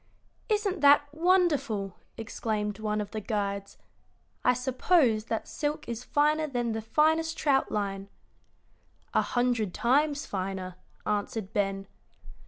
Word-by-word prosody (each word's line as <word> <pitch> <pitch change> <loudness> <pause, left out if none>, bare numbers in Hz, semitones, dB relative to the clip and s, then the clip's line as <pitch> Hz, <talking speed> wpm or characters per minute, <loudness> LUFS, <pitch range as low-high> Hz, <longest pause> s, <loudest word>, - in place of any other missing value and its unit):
"Isn't 410 -5 0
that 290 0 +5
wonderful!" 310 - +1 0.2
exclaimed 215 -2 -3
one 215 -1 -1
of 205 - -6
the 215 - -4
guides. 200 -2 -3 0.7
"I - - +5
suppose 250 -2 +2
that 225 -1 -3
silk 300 +1 -3
is 235 0 -4
finer 305 +3 +2
than 240 -4 -1
the 220 0 -2
finest 315 +7 +2
trout 275 -3 +2
line." 195 -1 -2 1.0
"A - - +4
hundred 240 -6 0
times 285 +4 +2
finer," 190 -1 -4 0.3
answered 210 0 -2
Ben. 195 -1 -1
235 Hz, 120 wpm, -28 LUFS, 210-295 Hz, 1.0 s, that